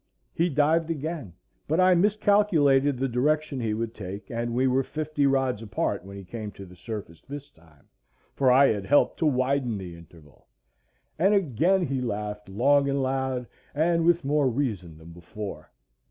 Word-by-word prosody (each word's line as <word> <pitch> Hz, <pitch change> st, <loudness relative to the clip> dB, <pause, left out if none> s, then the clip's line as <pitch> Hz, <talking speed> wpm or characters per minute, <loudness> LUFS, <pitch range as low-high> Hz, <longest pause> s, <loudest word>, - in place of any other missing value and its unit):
He 170 Hz, +2 st, +1 dB
dived 160 Hz, +3 st, +2 dB
again, 155 Hz, -, -4 dB, 0.3 s
but 160 Hz, +4 st, +1 dB
I 185 Hz, 0 st, +6 dB
miscalculated 175 Hz, -8 st, +3 dB
the 135 Hz, +2 st, 0 dB
direction 145 Hz, +3 st, 0 dB
he 110 Hz, -3 st, -1 dB
would 115 Hz, 0 st, -3 dB
take, 100 Hz, -1 st, -8 dB
and 120 Hz, 0 st, -2 dB
we 130 Hz, +2 st, +2 dB
were 130 Hz, +1 st, +2 dB
fifty 150 Hz, 0 st, -1 dB
rods 135 Hz, -5 st, +1 dB
apart 105 Hz, -5 st, -2 dB
when 100 Hz, +1 st, -10 dB
he 100 Hz, -, -8 dB
came 105 Hz, +3 st, -7 dB
to 100 Hz, -, -10 dB
the 90 Hz, 0 st, -15 dB
surface 100 Hz, -5 st, -8 dB
this 145 Hz, +1 st, -9 dB
time, 80 Hz, -3 st, -24 dB, 0.5 s
for 130 Hz, -2 st, +3 dB
I 135 Hz, +2 st, +6 dB
had 100 Hz, -3 st, -2 dB
helped 145 Hz, -, +3 dB
to 160 Hz, -, +2 dB
widen 130 Hz, -3 st, 0 dB
the 90 Hz, -3 st, -8 dB
interval; 80 Hz, -3 st, -18 dB, 0.7 s
and 195 Hz, +5 st, +4 dB
again 180 Hz, -, +2 dB
he 135 Hz, -2 st, -2 dB
laughed 105 Hz, -3 st, -4 dB
long 140 Hz, +7 st, +3 dB
and 140 Hz, 0 st, 0 dB
loud, 130 Hz, -1 st, -1 dB, 0.3 s
and 165 Hz, +2 st, +2 dB
with 170 Hz, -2 st, +2 dB
more 145 Hz, -1 st, +2 dB
reason 105 Hz, -, -3 dB
than 80 Hz, +1 st, -13 dB
before. 85 Hz, -1 st, -8 dB
130 Hz, 170 wpm, -26 LUFS, 105-150 Hz, 0.7 s, I